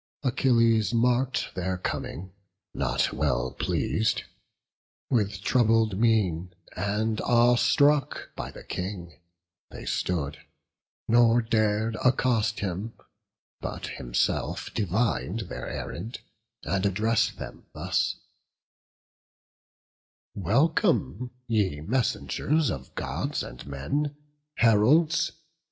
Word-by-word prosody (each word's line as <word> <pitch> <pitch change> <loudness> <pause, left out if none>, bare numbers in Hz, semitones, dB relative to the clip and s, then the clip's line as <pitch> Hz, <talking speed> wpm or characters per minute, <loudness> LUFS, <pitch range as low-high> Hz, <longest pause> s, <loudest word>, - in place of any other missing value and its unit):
Achilles 115 -5 +3
mark'd 125 +2 +1
their 95 0 -2
coming, 90 0 -4 0.4
not - - 0
well 65 -4 0
pleas'd: 110 0 0 0.9
With 105 -5 +1
troubled 115 -4 +3
mien, 95 -7 +1 0.2
and 105 +3 -1
awe 120 0 +4
struck 145 +2 +2
by - - -5
the - - -11
King, 90 -3 -6 0.5
They - - -9
stood, 70 +3 -2 0.7
nor 120 0 +5
dar'd 110 0 +1
accost 125 -3 +2
him; 100 +3 -3 0.7
but - - -5
himself - - -2
Divin'd 100 - 0
their 60 0 -5
errand, 110 +8 -5 0.4
and 95 +5 -1
address'd 105 +3 +1
them - - -9
thus: - - 0 2.2
"Welcome, 140 - +1 0.2
ye 105 -10 0
messengers 135 - 0
of 65 -1 -7
Gods - - -2
and 60 +3 -10
men, 140 - -2 0.4
Heralds! 135 +9 +4
110 Hz, 90 wpm, -27 LUFS, 90-120 Hz, 2.2 s, nor